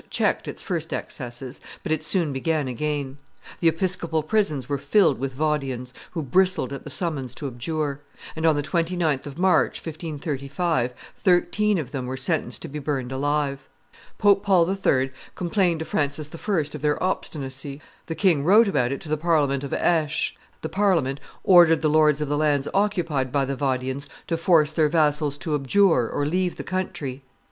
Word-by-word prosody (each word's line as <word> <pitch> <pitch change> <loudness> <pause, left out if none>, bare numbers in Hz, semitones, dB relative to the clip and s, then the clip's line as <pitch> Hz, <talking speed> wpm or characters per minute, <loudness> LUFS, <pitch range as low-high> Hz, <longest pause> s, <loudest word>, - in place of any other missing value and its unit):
checked - - 0
its - - -6
first - - -3
excesses, 125 +2 -5 0.2
but - - -3
it 155 -1 0
soon 165 -3 0
began 150 +1 0
again; 140 +1 -3 0.4
the 170 - +2
episcopal 165 -1 +1
prisons 155 - 0
were 140 -1 -1
filled 145 - +3
with 135 0 -3
Vaudians, 135 -4 -2 0.2
who 165 -3 -2
bristled 180 -1 +2
at 140 - -7
the - - -8
summons 140 - -2
to 145 - -7
abjure; 140 +3 -3 0.3
and 160 - -4
on 160 -2 +4
the 145 - -1
29th 165 -3 0
of 145 +1 -8
March, 185 +1 +3
1535, 150 -3 -2 0.3
thirteen 195 +2 +2
of 150 -7 -4
them 130 -3 -4
were 130 +1 -4
sentenced 130 -2 -1
to - - -5
be 150 +2 -6
burned 135 -3 -3
alive. 140 0 -1 0.5
Pope 200 -1 +4
Paul 185 -4 +4
III. 135 -8 +1 0.2
complained 175 -1 +1
to - - -3
Francis 145 0 -2
I. 200 +5 -3 0.2
of 150 - -7
their 150 +2 0
obstinacy; 140 -6 -3 0.3
the 165 - -3
king 160 -5 +3
wrote 210 +7 +6
about 125 -10 +1
it 140 - -4
to 155 - -7
the 155 - +1
Parliament 145 -4 +1
of 140 - -5
Aix; 160 -3 +1 0.3
the - - -1
Parliament 170 -9 +1 0.2
ordered 170 -4 +6
the 155 - +3
lords 150 -1 +4
of 150 - -1
the 145 +1 0
lands 145 -2 +2
occupied 170 -10 0
by 140 0 +1
the 140 +1 -3
Vaudians 130 0 -2 0.2
to 165 - -1
force 165 -2 +4
their 155 -1 +2
vassals 150 -2 +1
to 150 +3 -3
abjure 145 - +3
or 145 - -1
leave 180 +3 0
the - - -6
country. 175 -8 -4
150 Hz, 175 wpm, -24 LUFS, 135-170 Hz, 0.5 s, wrote